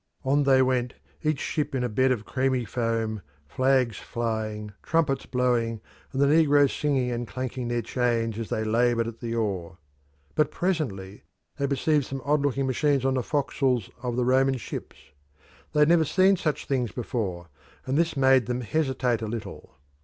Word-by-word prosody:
On 140 +2 +2
they 135 -1 +5
went, 125 -1 0 0.3
each 155 -2 +1
ship 150 -3 -2
in 125 - 0
a - - +1
bed 130 +4 +2
of 110 -4 -1
creamy 130 -2 0
foam, 115 -3 -2 0.3
flags 130 - +1
flying, 110 -2 -4
trumpets 155 -4 0
blowing, 120 -3 0 0.3
and 135 - -3
the 140 - +5
negroes 145 -2 +4
singing 135 -4 0
and 120 0 -3
clanking 130 0 -4
their 120 -1 -1
chains 115 -2 0
as 115 - -5
they 110 - -1
laboured 115 +1 +2
at 115 0 -7
the 115 -1 -4
oar. 95 -6 -2 0.6
But 150 -1 +2
presently 110 - -2 0.4
they 140 - 0
perceived 145 +1 +1
some 135 -1 -6
odd 150 0 +2
looking 140 -1 0
machines 135 +1 +1
on 135 - +2
the 130 - +1
forecastles 130 -4 0
of 125 -2 -2
the 125 0 +1
Roman 130 +1 +3
ships; 120 - -7 0.7
they 150 - +2
had 150 - +5
never 170 -1 +5
seen 190 +4 +4
such 155 -4 -2
things 125 -5 -1
before, 100 -9 -4 0.4
and 130 - -1
this 165 -1 +1
made 130 -3 +4
them 125 0 -2
hesitate 130 -3 0
a 110 - -3
little. 110 - -7
125 Hz, 175 wpm, -26 LUFS, 115-140 Hz, 0.7 s, they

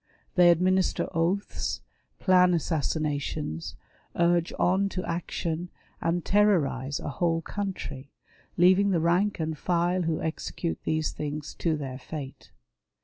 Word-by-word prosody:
They 175 -1 +6
administer 185 +2 +2
oaths, 175 +5 -1 0.4
plan 180 -2 +5
assassinations, 150 - -2 0.4
urge 170 0 +2
on 190 +2 +2
to 185 -1 -4
action, 170 0 -3 0.3
and 170 +1 0
terrorize 150 -10 +2
a - - -4
whole 165 +2 0
country, 155 -10 -5 0.5
leaving 185 +3 +5
the 180 -4 +2
rank 175 +5 +2
and 160 0 -1
file 175 +2 +1
who 165 -2 0
execute 165 +1 -3
these 155 0 0
things 150 0 -5
to 160 -2 +1
their 135 -3 -5
fate. 140 -1 -8
170 Hz, 120 wpm, -27 LUFS, 155-180 Hz, 0.5 s, They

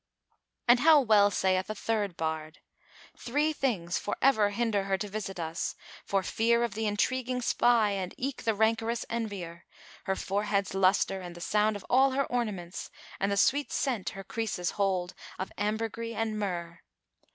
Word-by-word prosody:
'" - - -53
And 240 +1 +7
how 310 +2 +7
well 215 -5 +5
saith 190 -1 +1
a 215 - -3
third 205 -4 -1
bard,[FN#426] 160 -1 -7
"Three 295 +5 +1
things 200 - -1
for 205 - -3
ever 220 -6 +4
hinder 205 -2 0
her 195 -1 +1
to 205 +2 -4
visit 195 -2 -5
us, 165 0 -3 0.3
for 195 -1 0
fear 235 +4 +2
Of 235 -4 -1
the 220 +1 -1
intriguing 255 +4 0
spy 235 -3 +3
and 190 -2 -3
eke 270 +1 -3
the 225 -2 0
rancorous 225 +2 +1
envier; 200 -7 -4 0.4
Her 190 - 0
forehead's 200 0 -1
lustre 195 0 +2
and 175 -1 -8
the - - -9
sound 210 +4 +1
of 205 - -8
all 265 +1 +4
her 275 +1 +1
ornaments 205 -8 -3 0.3
And 195 +1 0
the 200 - 0
sweet 280 +7 +2
scent 225 -10 -1
her 195 - -6
creases 195 -4 -2
hold 190 -3 0 0.2
of 190 - -4
ambergris 225 +2 -2
and 220 -1 -1
myrrh. 170 -4 -4
210 Hz, 170 wpm, -29 LUFS, 190-235 Hz, 0.4 s, And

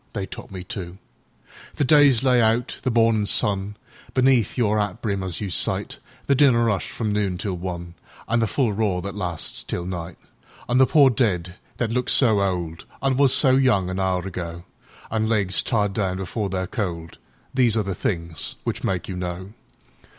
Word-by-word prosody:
They 100 -3 -3
taught - - -9
me, 95 -2 -7
too. 90 -1 -6 0.8
The - - 0
day's 140 -3 +5
lay 125 -2 +4
out—the 115 +3 0
mornin' 115 -2 +3
sunBeneath 115 +6 0
your 110 -3 +2
'at 105 0 -2
brim 100 -5 -2
as 95 -2 -4
you 100 -3 -4
sight; - - 0 0.3
The 140 - +3
dinner 125 -5 +4
'ush 100 - -2
from 110 -3 -2
noon 100 -3 0
till 95 +1 -3
one, 85 -1 -5 0.3
An' 115 - +1
the 115 - +1
full 120 -2 0
roar 100 -4 0
that 100 0 -5
lasts 90 -5 -3
till 85 - -4
night; 90 -2 -6 0.5
An' 125 +1 +2
the 130 - +6
pore 140 -4 +5
dead 95 -8 0 0.2
that 115 -2 -1
look 125 +1 -1
so 110 -6 +4
oldAn' 95 +7 -2
was 140 -2 +4
so 135 -1 +4
young 100 -9 +2
an 95 - -3
hour 95 -1 0
ago, 85 -2 -6 0.5
An' 110 -1 0
legs 100 -4 +2
tied 105 -5 0
down 95 -3 -1
before 100 +2 -3
they're 95 0 -2
cold—These 105 +6 -2
are 110 - +2
the 95 -1 -3
things 85 -4 -3
which - - -3
make 95 -3 -1
you 95 - -5
know. 90 +2 -5
100 Hz, 175 wpm, -23 LUFS, 90-115 Hz, 0.8 s, the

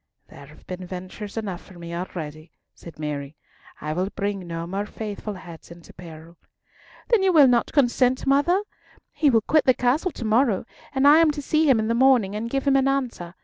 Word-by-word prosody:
"There 140 - -13
have 150 - -18
been 185 0 -7
ventures 185 +4 -8
enough 195 -5 -4
for 185 - -15
me 170 0 -8
already," 160 -3 -6 0.2
said 170 - -13
Mary. 150 -1 -5 0.4
"I 155 0 -4
will 185 +4 -1
bring 200 -3 -4
no 165 0 -5
more 195 +4 -4
faithful 210 -1 -6
heads 170 -3 -12
into 170 -2 -14
peril." 165 0 -12 0.7
"Then 460 -4 +4
will 320 -4 +6
you 275 - +8
not 240 -2 +2
consent, 255 -2 +2
mother? 290 +8 +2 0.5
He 295 - +2
will 225 -4 +3
quit 310 +7 +2
the 255 - +4
castle 265 +9 +1
to 255 -7 -7
morrow, 220 -2 +2 0.3
and 275 0 +2
I 300 +2 +8
am 330 -1 +5
to 295 -1 -3
see 310 +1 +2
him 260 - +5
in 220 - -1
the 230 - +1
morning 240 -5 +3
and 225 +2 -4
give 270 +2 -2
him 275 -1 +4
an 270 0 +2
answer. 245 -11 -2
215 Hz, 205 wpm, -24 LUFS, 175-270 Hz, 0.7 s, you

